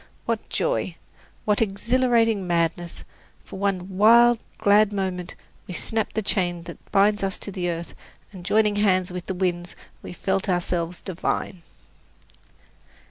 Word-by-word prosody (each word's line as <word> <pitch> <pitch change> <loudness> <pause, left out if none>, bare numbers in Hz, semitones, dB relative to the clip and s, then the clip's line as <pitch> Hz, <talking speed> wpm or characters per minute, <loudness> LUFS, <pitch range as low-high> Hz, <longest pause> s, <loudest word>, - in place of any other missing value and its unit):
What - - -2
joy! - - -1 0.5
What 210 0 +3
exhilarating 225 -1 +2
madness! 170 0 -1 0.4
For - - -9
one 190 -1 -2
wild, 235 +2 +7 0.2
glad 205 +1 +4
moment 185 -3 -3 0.3
we 180 - -6
snapped 220 +2 -2
the 220 - 0
chain 175 -4 -1
that 170 0 -12
binds 205 +1 +3
us 195 -1 -1
to 185 -3 -4
earth, 170 0 -4 0.4
and 185 -4 -10
joining 210 +2 +2
hands 185 -3 +2
with 180 -1 -6
the 190 - -3
winds 175 -1 -2 0.3
we - - -8
felt 190 +2 -1
ourselves 175 -1 -1
divine! 185 0 -3
190 Hz, 135 wpm, -24 LUFS, 175-210 Hz, 0.5 s, wild